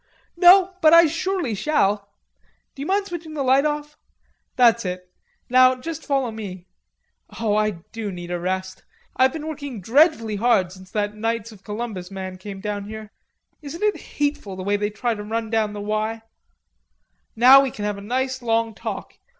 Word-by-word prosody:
"No; 365 +2 +6
but 315 0 +6
I 335 0 +9
surely 335 - -1
shall.... 205 -4 0 0.6
D'you 280 +2 -6
mind 395 +1 +1
switching 335 -4 -7
the 285 - -1
light 265 +2 +4
off?... 295 0 -5 0.6
That's 235 -2 +4
it. 180 -1 -5 0.4
Now 255 +1 +5
just 315 +5 -7
follow 270 -4 0
me. 190 -5 -8 0.7
Oh, 215 -2 +1
I 215 0 +2 0.2
do 220 -3 -5
need 175 -1 -7
a 175 - -2
rest. 185 +1 -3 0.3
I've 260 +1 +4
been 310 +1 -6
working 285 -6 -6
dreadfully 230 - +3
hard 215 -5 +2
since 185 0 -13
that 205 +1 -2
Knights 225 +1 -3
of 210 -2 -16
Columbus 210 -4 -5
man 190 -1 -7
came 195 0 -8
down 205 -1 -4
here. 215 0 -9 0.5
Isn't 315 +6 -7
it 420 -1 +2 0.2
hateful 290 -9 -1
the 185 - -6
way 200 +2 +1
they 205 0 -1
try 230 +3 -2
to 210 - -6
run 225 +1 -3
down 220 -2 +1
the 205 - -6
'Y'?... 215 +2 -2 1.1
Now 255 +4 +8
we 275 - 0
can 210 -4 -6
have 205 -1 -2
a - - -10
nice 255 +4 -2
long 230 -1 0
talk. - - -7
225 Hz, 175 wpm, -22 LUFS, 205-280 Hz, 1.1 s, I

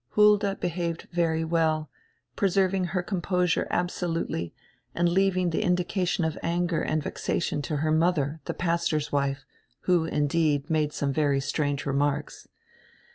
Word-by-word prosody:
Hulda 210 -1 +5
behaved 170 -2 -3
very 165 -2 +1
well, 160 -2 +1 0.5
preserving 190 -1 +2
her 180 +1 -2
composure 180 -2 0
abso 175 0 -1
lutely 85 - -2 0.4
and 175 0 +2
leaving 185 0 +2
die 160 - 0
indication 180 -2 0
of 160 - -2
anger 170 0 0
and 155 -1 -1
vexation 145 -1 -2
to 150 +2 -3
her 155 +2 0
mother, 160 -2 +1
the - - -3
pastor's 165 -3 0
wife, 140 0 -1 0.4
who, 175 -3 +2
indeed, 150 -1 +1
made 155 -2 +1
some 140 -2 -1
very 145 -2 +2
strange 145 0 -1
remarks. 145 +1 -1
165 Hz, 135 wpm, -27 LUFS, 150-180 Hz, 0.5 s, Hulda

